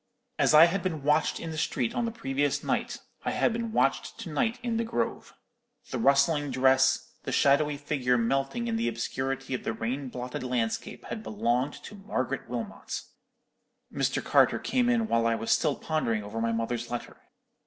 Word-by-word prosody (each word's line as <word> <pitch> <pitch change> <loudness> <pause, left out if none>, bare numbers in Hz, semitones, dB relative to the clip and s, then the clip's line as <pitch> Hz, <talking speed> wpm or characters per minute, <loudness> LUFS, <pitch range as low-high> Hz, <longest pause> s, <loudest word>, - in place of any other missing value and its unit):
"As - - +4
I 155 +2 +10
had 180 +3 0
been 160 -6 -3
watched 150 +2 +2
in 165 - -5
the 155 - -4
street 120 -5 -1
on 240 - 0
the 230 - -2
previous 145 - -1
night, - - -1 0.3
I - - -1
had - - +1
been 230 -1 -3
watched - - +1
to - - -6
night 240 -2 0
in 235 -2 -1
the 230 - +1
grove. 120 - -3 0.6
The - - -2
rustling 140 +2 +3
dress, 130 0 +3
the - - -5
shadowy 145 +1 +3
figure 135 -4 0
melting 135 - 0
in 225 -1 0
the 230 - 0
obscurity 135 0 -3
of 125 - -3
the - - -2
rain 125 +5 -3
blotted 125 0 -5
landscape 125 -3 -2
had 220 - -5
belonged 135 - 0
to - - -9
Margaret 200 0 -3
Wilmot! - - -5 0.9
"Mr. - - 0
Carter - - +4
came 250 -2 +1
in 230 -2 +2
while 115 - +2
I 115 - +2
was 115 0 -2
still 150 -4 +3
pondering 115 -9 -1
over 105 +2 -5
my 115 0 +1
mother's 115 +1 -2
letter. 120 -1 -5
140 Hz, 185 wpm, -28 LUFS, 125-185 Hz, 0.9 s, I